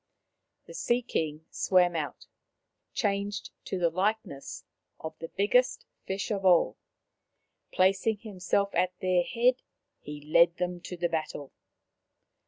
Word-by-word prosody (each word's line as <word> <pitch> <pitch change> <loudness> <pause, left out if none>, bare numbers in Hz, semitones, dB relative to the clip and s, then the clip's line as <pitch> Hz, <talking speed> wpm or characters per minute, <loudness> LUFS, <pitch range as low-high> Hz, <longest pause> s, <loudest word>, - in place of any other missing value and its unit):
The - - -11
Sea 245 - +1
king 155 -8 -2
swam 180 -2 +3
out, 150 -4 -4 0.7
changed 200 0 -1
to 190 - -2
the 170 -2 +2
likeness 190 -5 -2 0.4
of 160 0 -6
the 165 - -5
biggest 250 +8 +2 0.2
fish 195 +4 -2
of 200 -2 -1
all. 180 -3 +4 0.9
Placing 195 +4 +3
himself 200 -1 -1
at 180 +1 +1
their 185 -1 +3
head, 245 +7 +2 0.4
he 150 0 -8
led 170 +3 +5
them 180 0 -2
to 180 - -6
the 175 0 +1
battle. 155 -4 -3
185 Hz, 125 wpm, -29 LUFS, 170-205 Hz, 0.9 s, led